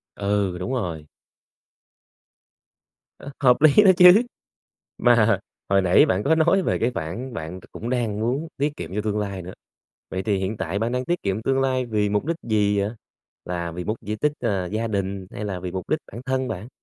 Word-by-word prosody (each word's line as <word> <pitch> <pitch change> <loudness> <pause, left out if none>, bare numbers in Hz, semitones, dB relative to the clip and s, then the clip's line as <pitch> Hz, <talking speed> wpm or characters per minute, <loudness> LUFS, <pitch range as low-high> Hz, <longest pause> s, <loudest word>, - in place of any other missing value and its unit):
Ừ, 100 -2 0
đúng 105 +8 -3
rồi. 85 -11 -3 2.1
Ơ, 140 - -9
hợp 125 -3 +5
lý 155 +7 +7
đó 195 - +8
chứ, 180 +4 +9 0.8
mà 115 -4 +4 0.3
hồi 100 0 +3
nãy 90 -1 +5
bạn 95 +2 0
có 155 +7 +3
nói 170 +4 +3
về - - 0
cái 120 - +1
khoản 105 +11 -5
bạn 80 +2 -6
cũng 115 - -5
đang 115 -5 -1
muốn 130 +8 -1
tiết 145 +2 -1
kiệm - - -7
cho 105 - 0
tương 105 -1 -1
lai 100 -3 -3
nữa. 90 +2 -8 0.6
Vậy 95 - -3
thì 100 -1 0
hiện 95 +3 -2
tại 95 0 -3
bạn 115 +3 -1
đang 125 0 -1
tiết 175 +5 -2
kiệm 100 +2 -2
tương 135 +3 +1
lai 130 -1 0
vì 105 -3 0
mục 105 +3 0
đích 165 0 -1
gì 105 -2 +1
vậy? 100 +1 -1 0.5
Là 85 -1 -4
vì 90 +2 -5
mục 110 +4 -2
di 105 +1 -4
tích, 150 +7 +1
ờ, 100 -6 -1
gia 110 +5 -2
đình 100 -2 -3
hay 105 - -6
là 95 -3 -4
vì 90 0 -5
mục 95 -1 -5
đích 155 - +1
bản 115 - -8
thân 130 -1 -1
bạn? 105 +2 -5
105 Hz, 205 wpm, -23 LUFS, 95-130 Hz, 2.1 s, chứ